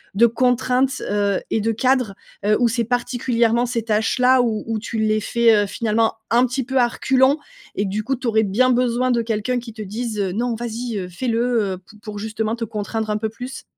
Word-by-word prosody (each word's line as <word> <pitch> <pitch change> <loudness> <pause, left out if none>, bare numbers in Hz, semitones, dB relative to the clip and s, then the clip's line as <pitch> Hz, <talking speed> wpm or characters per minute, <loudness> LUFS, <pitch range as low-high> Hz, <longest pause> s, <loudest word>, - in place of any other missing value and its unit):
de 235 - +6
contraintes, 250 +2 +1
heu 200 -1 +1
et 220 - +1
de 225 +2 +1
cadres? 250 -3 +1 0.3
Heu, 210 +1 +3
ou 240 - +4
c'est 230 +1 0
particulièrement 240 0 +1
ces 230 -2 -2
tâches 220 +2 0
là 255 +1 +5
où 225 -3 -1
où 225 -1 -2
tu 225 +1 -5
les 215 0 +2
fais, 230 0 +3
heu, - - -7
finalement 225 +1 0 0.2
un 240 +2 +5
petit 260 +2 -2
peu 265 +1 -2
à 240 - +5
reculons 260 +2 +3 0.5
et 200 - 0
que 195 - -2
du 210 +2 -2
coup 265 +3 -1
tu 250 -1 -5
aurais 220 -1 +3
bien 220 +6 +2
besoin 250 0 +2
de 235 -1 +2
quelqu'un 230 +2 -1
qui 230 -2 -9
te 220 - -8
dise, 215 +2 -4
heu: 195 -2 0
«Non 235 +3 -1
vas-y, 235 -1 -4
heu, 185 - -4
fais 215 +9 -5
le, 230 -4 +1
heu» - - -6
p 210 - -17
pour 210 -2 -7
justement 220 +1 -2
te 230 - -5
contraindre 215 +1 -4
un 210 - +1
peu 220 - -2
plus? 250 +4 -8
230 Hz, 230 wpm, -21 LUFS, 215-245 Hz, 0.5 s, de